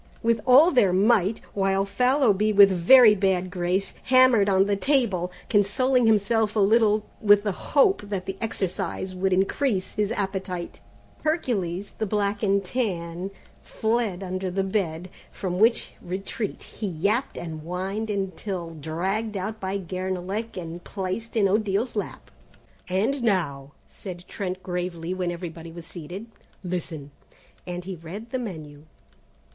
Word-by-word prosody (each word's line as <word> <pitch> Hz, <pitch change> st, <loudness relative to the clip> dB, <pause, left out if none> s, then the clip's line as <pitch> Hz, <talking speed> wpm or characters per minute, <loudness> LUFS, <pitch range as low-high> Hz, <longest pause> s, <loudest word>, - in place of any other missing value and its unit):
Marchons!" -, -, -28 dB
with 230 Hz, -1 st, +2 dB
all 285 Hz, +8 st, +7 dB
their 210 Hz, -, +4 dB
might, 205 Hz, +1 st, +3 dB
while 195 Hz, 0 st, +1 dB
Fallowby 215 Hz, -1 st, +2 dB
with 200 Hz, -1 st, +7 dB
very 215 Hz, +6 st, +7 dB
bad 190 Hz, -2 st, 0 dB
grace, 185 Hz, +2 st, -1 dB
hammered 255 Hz, -5 st, +5 dB
on 190 Hz, 0 st, +4 dB
the 200 Hz, 0 st, +1 dB
table, 200 Hz, -6 st, +1 dB, 0.2 s
consoling 245 Hz, +4 st, +2 dB
himself 220 Hz, 0 st, +2 dB
a -, -, +2 dB
little 215 Hz, +1 st, +4 dB, 0.2 s
with 205 Hz, -1 st, +5 dB
the 210 Hz, -, 0 dB
hope 295 Hz, -, +2 dB
that 190 Hz, -3 st, -3 dB
the 195 Hz, -, -4 dB
exercise 190 Hz, -3 st, -3 dB
would 190 Hz, +1 st, 0 dB
increase 195 Hz, +2 st, 0 dB
his 210 Hz, 0 st, 0 dB
appetite. 190 Hz, -4 st, -4 dB, 0.4 s
Hercules, 205 Hz, -, -1 dB
the 220 Hz, -, -1 dB
black 205 Hz, 0 st, -1 dB
and 200 Hz, -1 st, +1 dB
tan, 180 Hz, -5 st, -3 dB, 0.3 s
fled 220 Hz, -4 st, -1 dB
under 185 Hz, 0 st, -3 dB
the 190 Hz, +2 st, -1 dB
bed, 185 Hz, -4 st, -2 dB, 0.2 s
from 180 Hz, -2 st, -4 dB
which 230 Hz, +2 st, +3 dB
retreat 195 Hz, +4 st, -5 dB
he 215 Hz, -, -6 dB
yapped 200 Hz, -, -1 dB
and 160 Hz, -2 st, -6 dB
whined 190 Hz, +6 st, -4 dB
until 190 Hz, -3 st, -3 dB
dragged 190 Hz, +8 st, -3 dB
out 215 Hz, +4 st, -4 dB
by 190 Hz, 0 st, -2 dB
Guernalec 185 Hz, +3 st, -4 dB
and 170 Hz, 0 st, -6 dB
placed 200 Hz, +4 st, -5 dB
in 210 Hz, -3 st, +4 dB
Odile's 210 Hz, +4 st, 0 dB
lap. 205 Hz, -, -5 dB, 0.6 s
"And 220 Hz, +9 st, 0 dB
now," 145 Hz, -11 st, -1 dB
said 180 Hz, -3 st, -9 dB
Trent 185 Hz, -2 st, -5 dB
gravely, 180 Hz, -1 st, -3 dB
when 180 Hz, -2 st, -2 dB
everybody 170 Hz, -1 st, -7 dB
was 170 Hz, 0 st, -9 dB
seated, 175 Hz, +5 st, -8 dB, 0.4 s
"listen!" 165 Hz, -5 st, -5 dB, 0.6 s
and 175 Hz, 0 st, -5 dB
he 190 Hz, -1 st, -5 dB
read 190 Hz, +8 st, -9 dB
the 260 Hz, -, -1 dB
menu. 155 Hz, -9 st, -8 dB
195 Hz, 140 wpm, -25 LUFS, 180-215 Hz, 0.6 s, all